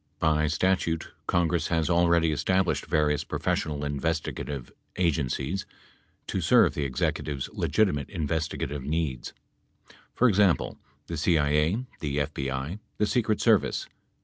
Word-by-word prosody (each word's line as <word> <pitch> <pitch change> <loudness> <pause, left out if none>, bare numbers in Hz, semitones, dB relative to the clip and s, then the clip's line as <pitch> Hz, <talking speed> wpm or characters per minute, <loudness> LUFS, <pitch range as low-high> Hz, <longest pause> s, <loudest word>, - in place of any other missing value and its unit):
By 75 0 +2
statute 85 0 0 0.2
Congress 85 -1 +1
has 80 -2 +1
already 85 -1 +3
established 95 +5 +1
various 75 -2 +1
professional 75 -1 -2
investigative 75 -2 -3 0.3
agencies 80 0 -1 0.6
to - - -2
serve - - +5
the 75 - -2
Executive's 70 +2 -2
legitimate 90 -10 +1
investiga 80 -2 -2
tive 70 0 -5
needs; 75 -3 -2 0.8
for 125 - +4
example, 100 - +2 0.3
the 85 - -5
CIA, 75 - +2
the 70 -2 -2
FBI, 70 +4 -2 0.2
the 105 - +2
Secret 110 -1 +1
Service. - - +3
80 Hz, 115 wpm, -27 LUFS, 75-90 Hz, 0.8 s, serve